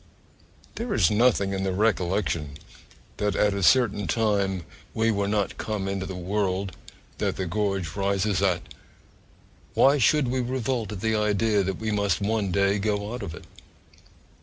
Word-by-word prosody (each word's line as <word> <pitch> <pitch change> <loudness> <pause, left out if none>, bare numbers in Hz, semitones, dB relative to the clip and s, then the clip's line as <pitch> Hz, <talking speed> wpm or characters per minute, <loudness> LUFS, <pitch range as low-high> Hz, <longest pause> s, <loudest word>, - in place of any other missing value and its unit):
There 235 -1 -2
is 85 -7 +3
nothing 105 -3 +3
in 95 - -2
the 95 -1 -1
recollection 90 -7 0 0.6
that 105 0 0
at 105 -1 +2
a 100 - -2
certain 105 -2 +3
time 100 -2 0 0.3
we 115 0 +2
were 100 -1 0
not 105 -1 -1
come 105 -3 -3
into 95 -1 -3
the 95 - -6
world 95 +1 -2 0.4
that - - 0
'the 95 - -3
gorge 95 -3 -2
rises 100 0 0
at' 90 -3 +1 1.1
why 140 +2 +5
should 140 +1 +3
we 130 +1 0
revolt 125 -2 -2
at 100 -3 -6
the 110 0 +1
idea 105 0 +2
that 95 -1 -2
we 110 0 -3
must 100 -1 +1
one 105 -1 0
day 100 +1 +2
go 105 +1 -1
out 125 - -5
of 90 -6 -6
it? - - -12
100 Hz, 160 wpm, -25 LUFS, 95-110 Hz, 1.1 s, why